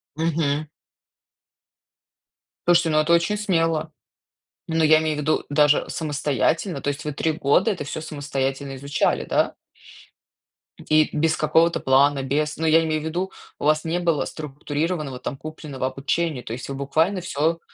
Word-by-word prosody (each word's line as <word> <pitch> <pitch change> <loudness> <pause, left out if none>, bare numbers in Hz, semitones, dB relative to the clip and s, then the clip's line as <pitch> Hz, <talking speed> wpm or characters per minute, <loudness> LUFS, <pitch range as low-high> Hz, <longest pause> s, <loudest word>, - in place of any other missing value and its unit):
Мгм. 155 -2 0 2.0
Слушайте, 175 -1 +4
но 155 0 +3
это 160 +2 +2
очень 170 +5 +2
смело. 165 -6 0 0.8
Но 160 0 +1
я 155 0 +6
имею 155 -1 -1
ввиду 155 +1 0
даже 145 0 +3
самостоятельно, 150 +2 -1
то - - -1
есть 145 0 -4
вы 150 - -3
3 160 +3 0
года 150 +8 +2
это 180 -7 -4
всё 145 - -5
самостоятельно 140 -3 -3
изучали, 140 +2 0
да? - - +1 1.3
И 155 0 +4
без 155 0 +2
какого-то 165 +2 +3
плана. 135 +1 +3
Без 150 +3 -1
но 160 0 -1
я 165 +1 +5
имею 155 -1 -1
ввиду 175 +5 -3 0.3
у - - -4
вас 155 +1 +2
не 165 +2 0
было 170 -4 +1
структурированного, 150 -1 -4
там, 135 - -5
купленного 150 -4 -6
обучения, 140 +1 -2
то 110 - -6
есть 125 +1 -6
вы 135 - -4
буквально 160 +8 0
всё 165 0 0
155 Hz, 150 wpm, -23 LUFS, 145-165 Hz, 2.0 s, я